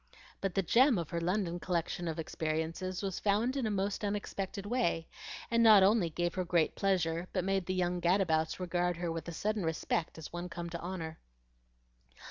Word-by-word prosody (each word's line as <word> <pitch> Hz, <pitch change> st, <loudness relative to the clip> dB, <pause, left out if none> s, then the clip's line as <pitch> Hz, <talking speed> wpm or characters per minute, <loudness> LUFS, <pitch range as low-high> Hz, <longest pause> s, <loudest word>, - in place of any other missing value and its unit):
But 195 Hz, -2 st, -2 dB
the 195 Hz, -, +2 dB
gem 245 Hz, -, +5 dB
of 170 Hz, -3 st, -4 dB
her 170 Hz, -1 st, -1 dB
London 175 Hz, 0 st, 0 dB
collection 175 Hz, -1 st, -2 dB
of 160 Hz, 0 st, -3 dB
experiences 160 Hz, +4 st, -3 dB
was 190 Hz, -2 st, -2 dB
found 215 Hz, +6 st, +1 dB
in 265 Hz, -5 st, 0 dB
a -, -, 0 dB
most 200 Hz, 0 st, -1 dB
unexpected 200 Hz, -1 st, -3 dB
way, 205 Hz, -8 st, 0 dB, 0.4 s
and 230 Hz, 0 st, +4 dB
not 215 Hz, -4 st, +8 dB
only 200 Hz, -3 st, +4 dB
gave 175 Hz, +2 st, -1 dB
her 185 Hz, -, -1 dB
great 170 Hz, -3 st, +2 dB
pleasure, 175 Hz, -3 st, 0 dB
but 185 Hz, -, 0 dB
made 195 Hz, -1 st, 0 dB
the 185 Hz, -, -1 dB
young 180 Hz, -1 st, 0 dB
gadabouts 170 Hz, -3 st, +2 dB
regard 175 Hz, -1 st, 0 dB
her 170 Hz, -1 st, -2 dB
with 165 Hz, +1 st, -4 dB
sudden 215 Hz, +3 st, -1 dB
respect 160 Hz, 0 st, -1 dB
as 160 Hz, 0 st, -9 dB
one 175 Hz, +1 st, -4 dB
come 170 Hz, 0 st, -6 dB
to 170 Hz, -, -4 dB
honor. 170 Hz, -3 st, -5 dB
180 Hz, 185 wpm, -32 LUFS, 170-195 Hz, 0.4 s, not